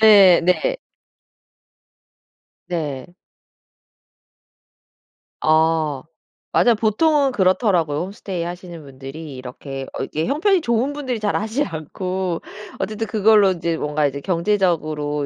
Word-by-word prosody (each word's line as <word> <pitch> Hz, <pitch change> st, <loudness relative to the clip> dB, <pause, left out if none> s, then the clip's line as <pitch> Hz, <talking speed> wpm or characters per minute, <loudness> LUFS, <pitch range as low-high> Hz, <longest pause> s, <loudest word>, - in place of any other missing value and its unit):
네. 200 Hz, -5 st, +8 dB
네. 180 Hz, -, +1 dB, 1.9 s
네. 160 Hz, -2 st, -4 dB, 2.3 s
아 155 Hz, -3 st, +2 dB, 0.5 s
맞아요. 240 Hz, -2 st, +4 dB
보통은 275 Hz, +6 st, +2 dB
그렇더라고요. 185 Hz, -7 st, +2 dB
홈스테이 190 Hz, -2 st, -5 dB
하시는 175 Hz, -2 st, -7 dB
분들이 135 Hz, +2 st, -9 dB
이렇게 135 Hz, +1 st, -7 dB
어 -, -, -3 dB
이게 155 Hz, +1 st, -3 dB
형편이 350 Hz, +7 st, +2 dB
좋은 240 Hz, +2 st, 0 dB
분들이 260 Hz, -5 st, -3 dB
잘 210 Hz, -1 st, -1 dB
하지 220 Hz, +7 st, 0 dB
않고 180 Hz, -, -4 dB, 0.4 s
어쨌든 215 Hz, +1 st, -3 dB
그걸로 210 Hz, -2 st, +4 dB
인제 170 Hz, -2 st, -2 dB
뭔가 150 Hz, 0 st, 0 dB
이제 140 Hz, 0 st, -2 dB
경제적으로 165 Hz, -5 st, 0 dB
180 Hz, 245 characters per minute, -21 LUFS, 155-215 Hz, 2.3 s, 네